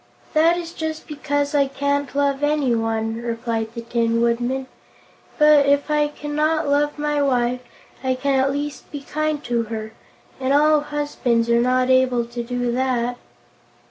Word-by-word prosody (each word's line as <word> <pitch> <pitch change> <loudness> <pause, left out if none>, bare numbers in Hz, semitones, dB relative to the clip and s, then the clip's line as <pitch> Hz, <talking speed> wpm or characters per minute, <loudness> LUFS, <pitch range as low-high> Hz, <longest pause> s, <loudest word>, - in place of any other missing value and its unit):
"That 330 +2 +4
is 340 -1 -6
just 315 -1 -4
because 285 -1 -2
I 280 -1 +3
can't 280 0 -2
love 280 -1 +1
anyone," 225 -6 0
replied 230 -1 -3
the 235 - -4
Tin 230 0 0
Woodman. 240 +3 0 0.7
"But, 300 -2 +6
if 285 +1 +2
I 300 0 +3
cannot 300 +1 -1
love 290 +1 +1
my 295 0 0
wife, 250 -2 +1 0.4
I 260 0 +1
can 270 +1 +1
at 270 +1 +2
least 290 +1 -5
be 290 - -6
kind 305 0 -2
to 235 -1 -1
her, 220 0 -6 0.5
and 265 +1 0
all 300 +1 +5
husbands 290 -6 -1
are 235 0 +4
not 255 +1 +2
able 255 -2 +3
to 240 +1 -6
do 245 0 -2
that." 245 -1 -1
270 Hz, 155 wpm, -21 LUFS, 240-295 Hz, 0.7 s, But